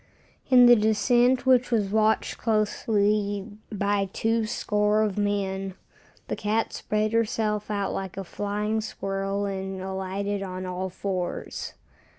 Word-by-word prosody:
In 250 -1 +8
the 240 0 +9
descent 240 +4 +3
which 255 -1 +4
was 215 -5 +1
watched 220 0 +1
closely 210 -2 +1 0.2
by 200 -1 0
two 225 +1 0
score 210 -2 +1
of 210 -3 -1
men, 195 -2 -1 0.5
the - - -2
cat 215 +2 -1
spread 215 +1 -1
herself 215 -2 0
out 200 -2 -1
like 190 -1 -5
a 195 - -3
flying 210 +3 -2
squirrel 195 -1 -3
and 190 -1 -4
alighted 190 +1 -3
on 185 -1 -5
all 185 +1 -3
fours. 185 -1 -4
205 Hz, 130 wpm, -26 LUFS, 195-220 Hz, 0.5 s, the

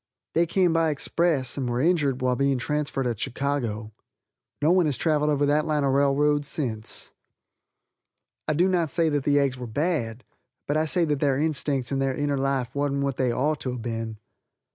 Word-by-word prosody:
They 170 +1 +3
came 180 -1 +2
by 165 -1 +2
express, 150 -3 0
and 130 -3 -2
were 120 0 -1
injured 145 -5 +1
while 125 0 +2
being 140 0 +1
transferred 145 0 -2
at 120 -4 -2
Chicago. 120 -6 -2 0.7
No 155 +3 +3
one 180 -3 +4
has 145 - 0
travelled 150 -2 +1
over 145 -1 +2
that 150 +2 +2
line 150 -2 +1
of 135 -1 +2
railroad 145 +1 +3
since. 120 -7 -4 1.4
I 155 - +2
do 175 +4 +3
not 175 -4 +1
say 165 0 +1
that 145 -3 -1
the 145 0 +3
eggs 135 -3 +1
were 125 - -5
bad, 125 -3 -2 0.4
but 145 - -1
I 155 +1 +2
say 170 +2 +2
that 150 -3 0
their 140 -2 +2
instincts 145 -4 -1
and 135 -1 0
their 135 -1 0
inner 145 -1 0
life 135 -2 -1
wasn't 140 -1 0
what 140 -1 -2
they 130 -2 +1
ort 150 +5 0
to 125 - -3
have 120 -2 -6
been. 115 -2 -4
140 Hz, 195 wpm, -25 LUFS, 130-155 Hz, 1.4 s, one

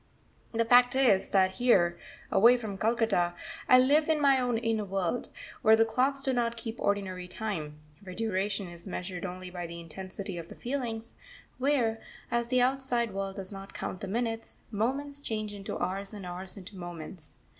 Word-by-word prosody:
The 230 0 +1
fact 245 +1 +6
is 245 -8 +4
that 190 -1 +3
here, 175 -9 +4 0.4
away 240 +4 +7
from 215 -4 -5
Calcutta, 215 -5 +1 0.3
I 255 - +9
live 290 +5 +4
in 315 -1 +3
my 275 -2 +5
own 245 -2 +1
inner 225 -2 0
world, 195 +3 -1 0.3
where 220 +1 +7
the 225 0 +4
clocks 265 +5 +1
do 265 - +2
not 235 -1 0
keep 230 0 -6
ordinary 190 -3 -1
time; 170 -7 -4 0.2
where 185 -2 -9
duration 200 -2 -1
is 170 +1 -11
measured 180 -1 -4
only 180 0 -6
by 175 -1 -5
the 170 0 -7
intensity 185 +2 -6
of 165 - -8
the - - -11
feelings; 235 -3 -4 0.5
where, 250 -5 +2 0.3
as 235 0 +1
the 250 +1 +3
outside 250 -4 +1
world 195 0 -3
does 190 0 -7
not 195 0 -9
count 185 - -4
the 200 - -4
minutes, 225 +2 -2
moments 275 +7 -1
change 215 -6 -3
into 200 -1 -5
hours 195 +3 -3
and 200 -3 -7
hours 180 +3 -6
into 195 +2 -10
moments. 175 -2 -8
215 Hz, 175 wpm, -30 LUFS, 185-240 Hz, 0.5 s, I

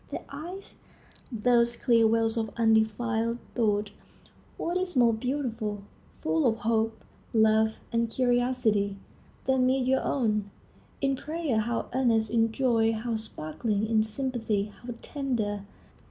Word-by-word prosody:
Their - - -6
eyes, 345 +7 -6 0.5
those 235 +1 +3
clear 230 -2 +4
wells 225 0 +2
of 225 -2 -1
undefiled 225 +1 +2 0.2
thought,—what 215 - -3
is 370 -1 -1
more 240 -2 +5
beautiful? 225 -4 -3 0.4
Full 160 0 +2
of 225 - +2
hope, 225 0 0 0.3
love, 220 0 +3
and 230 -1 +1
curiosity, 245 -5 +1 0.5
they 265 0 +2
meet 255 0 +2
your 265 +1 +2
own. 210 -6 0 0.5
In 275 -1 +2
prayer, 300 -4 -1
how 230 +2 -1
earnest; 230 -4 +2
in 225 -1 +2
joy, 230 -3 +2
how 225 +1 -2
sparkling; 210 +1 -2
in 220 0 +3
sympathy, 220 -3 -1
how 240 -1 -6
tender! 220 -8 -2
230 Hz, 125 wpm, -28 LUFS, 220-250 Hz, 0.5 s, more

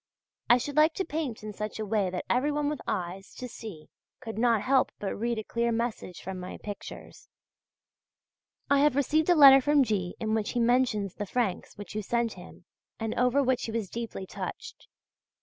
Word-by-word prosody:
I 240 - +8
should 280 +4 -5
like 310 +1 +5
to 380 - -1
paint 295 -9 -4
in 215 -1 -6
such 210 +1 -5
a 215 - -3
way 205 -2 +1
that 180 0 -4
everyone 290 +3 +1
with 300 -3 -4
eyes 190 0 -4
to 250 - -6
see 210 -10 -9 0.3
could 225 -3 -7
not 230 -3 +3
help 265 0 +3
but 200 - -3
read 235 +2 -2
a 220 - -3
clear 235 +2 -1
message 230 -6 -3
from 190 0 -5
my 180 0 -7
pictures. 205 -1 -9 1.4
I 280 0 +4
have 290 -2 +4
received 305 +4 +2
a 350 - +6
letter 275 -3 +9
from 290 +1 +4
G. 195 -6 -2
in 220 -1 -1
which 220 -2 -1
he 245 - 0
mentions 235 -5 +2
the 205 - -5
francs 225 -4 -2
which 205 - -8
you 215 - -2
sent 235 +2 0
him 180 -1 -13 0.3
and 225 -1 -2
over 250 +3 +2
which 260 -1 +1
he 225 - -4
was 220 -4 -3
deeply 230 -4 -5
touched. - - -7
230 Hz, 195 wpm, -28 LUFS, 205-265 Hz, 1.4 s, letter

